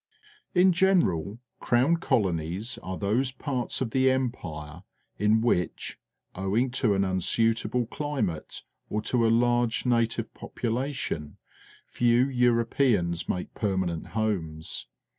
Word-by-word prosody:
In 180 +1 +6
general. 165 - +2 0.2
Crown 130 +8 +3
Colonies 100 - -1
are 95 -3 -5
those 120 +6 +1
parts 130 -2 -2
of 120 -4 -1
the 130 +1 +3
Empire 85 - -3 0.4
in 105 +2 +3
w^iich, 90 -7 -1 0.4
owing 105 +7 0
to 120 -5 +1
an 95 - +2
unsuitable 115 +5 +1
climate 130 - -3 0.3
or 105 0 -2
to 115 -1 +2
a - - +3
large 120 0 +2
native 115 -2 +1
population, 120 - -3 0.5
few 120 +1 +3
Europeans 115 -8 +1
make 90 - -3
permanent 95 -5 -1
homes. 85 -7 -2
115 Hz, 110 wpm, -27 LUFS, 95-125 Hz, 0.5 s, In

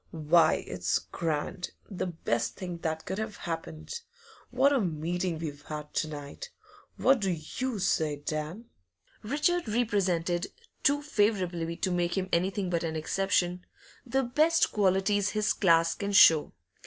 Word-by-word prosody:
Why, 160 0 +3
it's 90 0 0
grand; 165 +2 -3
the 190 -2 -3
best 120 -9 -2
thing 180 -2 -6
that 160 -1 -3
could 190 - -3
have 220 -1 -4
happened! 165 - -5 0.5
What 265 +3 +3
a 270 - +2
meeting 175 0 -2
we've 150 -3 -6
had 150 -1 -7
to 155 - 0
night! 145 - -8 0.5
What 265 0 +4
do 195 -2 0
you 195 +9 -3
say, 160 -5 +1
Dan?' 155 +8 -5 0.6
Richard 300 +7 0
represented 190 -6 0 0.3
too 290 +1 +2
favourably 185 - 0
to 185 - -1
make 175 +1 0
him 185 0 -1
anything 185 +2 0
but 170 -1 0
an 160 -1 -2
exception 180 +2 0 0.4
the 265 +2 0
best 310 +7 +3
qualities 200 0 +2
his 215 -1 +1
class 165 -3 +3
can 200 0 -4
show. 160 -5 +7
180 Hz, 140 wpm, -29 LUFS, 160-210 Hz, 0.6 s, show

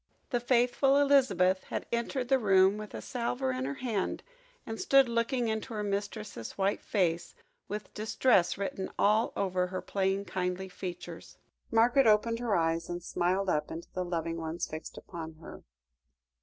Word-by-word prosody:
The 245 - +2
faithful 250 +3 +3
Elizabeth 260 -10 +3
had - - -4
entered 235 +2 -1
the 265 +1 +3
room 195 -1 +4
with 215 -1 -8
a - - -6
salver 130 - -2
in 130 0 -2
her 140 +1 -3
hand, 225 -7 -2 0.4
and 225 0 -5
stood 275 -1 +5
looking 235 +1 0
into 220 +1 -3
her 210 - -2
mistress's 205 - -4
white 195 +1 0
face, 175 -5 0 0.3
with 210 -1 -6
distress 215 -4 +2
written 195 -1 -3
all 215 +3 +3
over 185 -2 0
her 185 0 -4
plain 195 0 0
kindly 185 +1 -3
features. 175 -2 -8 0.3
Margaret 240 +3 +4
opened 230 +2 +3
her 235 -4 0
eyes, 165 0 0
and 175 0 -4
smiled 185 +3 0
up 150 -4 0
into 170 +1 -7
the 185 - -1
loving 165 -1 -2
ones 165 +1 -3
fixed 155 +1 -8
upon 165 -2 -7
her. 160 - -11
195 Hz, 160 wpm, -30 LUFS, 175-230 Hz, 0.4 s, stood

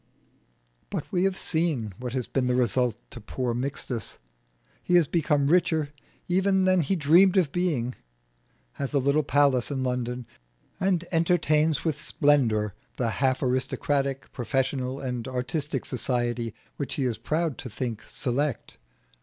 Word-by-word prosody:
But - - -4
we 180 0 +2
have 195 -1 0
seen 155 - -1
what 125 -1 -5
has 130 -2 -1
been 130 -2 -1
the 125 - +2
result 125 -1 +1
to - - -9
poor 120 +3 -2
Mixtus. 125 -3 -3 0.6
He 180 - +1
has 175 -2 +6
become 145 -2 +1
richer 160 -2 +2 0.3
even 190 +1 +2
than 185 -1 +4
he 160 +6 0
dreamed 175 +5 +5
of 170 -7 +3
being, 145 -9 0 0.9
has 140 +1 -2
a - - +5
little 140 +3 +3
palace 140 -4 +2
in 135 -2 -2
London, 125 -1 -2 0.5
and 185 -2 +1
entertains 160 -3 +2
with 155 -2 -1
splendour 125 - +2 0.2
the 115 -3 0
half 130 -1 +2
aristocratic, 135 +1 -1
professional, 130 +2 -1
and 125 -3 -4
artistic 130 +3 -2
society 120 -2 -2 0.2
which 140 -3 -3
he 140 - -1
is 120 -4 -1
proud 155 +4 -1
to 125 - -6
think 115 0 -4
select. 135 +1 -2
135 Hz, 145 wpm, -26 LUFS, 125-160 Hz, 0.9 s, has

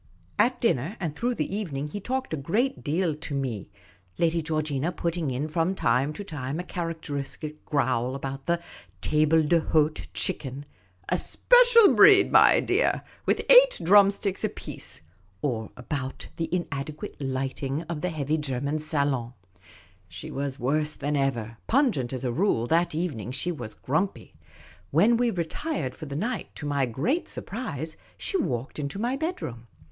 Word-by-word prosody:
At 255 +1 +3
dinner 185 - 0
and 165 -6 -3
through 245 +7 -1
the 195 - -2
evening 150 -9 -3
he 205 - -5
talked 260 +1 -3
a - - +2
great 210 - -1
deal 160 +2 0
to 150 -1 -5
me, 125 -7 -3 0.5
Lady 165 0 +2
Georgina 155 -1 -1
putting 170 -3 -2
in 130 +4 -2
from 165 +4 0
time 135 -4 +2
to 205 - -6
time 150 -5 -4
a - - -3
char 170 -2 -3
acteristic 150 -1 -6
growl 130 -3 0
about 135 0 -6
the 170 0 +2 0.4
tablc 155 +2 +3
d'hdte 155 -2 +2
chicken 135 +1 -2
— 95 +1 -34
" 90 +1 -16
a - - +2
special 485 -3 +6
breed, - - +7
my - - +7
dear, - - +1 0.2
with - - +1
eight - - +7
drumsticks 200 +1 +4
apiece" - - -5 0.2
— 95 0 -36
or 115 -6 -1
about 130 +2 -5
the 165 -1 -2
inadequate 155 -4 -4
lighting 135 +2 -2
of 160 -2 -5
the 180 - 0
heavy 155 -1 -1
German 140 +1 -2
salo7t. 140 -6 -1 0.7
She 90 0 -9
was 140 -1 -3
worse 150 +4 0
than 145 +1 -2
ever; 120 -5 -1
pungent 230 - +2
as 130 -1 -4
a 125 - 0
rule, 145 - +1
that 165 +4 +1
evening 155 - -3
she 135 +8 -2
was 120 -9 -6
grumpy. 160 +9 -2 0.6
When 205 +11 +4
we 240 +1 +2
retired 175 - -3
for 155 - -9
the 140 - -5
night, 215 - -3
to - - -6
my 140 -2 +1
great 190 - -1
surprise, 165 - -5 0.2
she - - -3
walked 125 - -2
into 140 +5 -4
my 240 +5 0
bedroom. 270 - -4
150 Hz, 160 wpm, -26 LUFS, 135-180 Hz, 0.7 s, breed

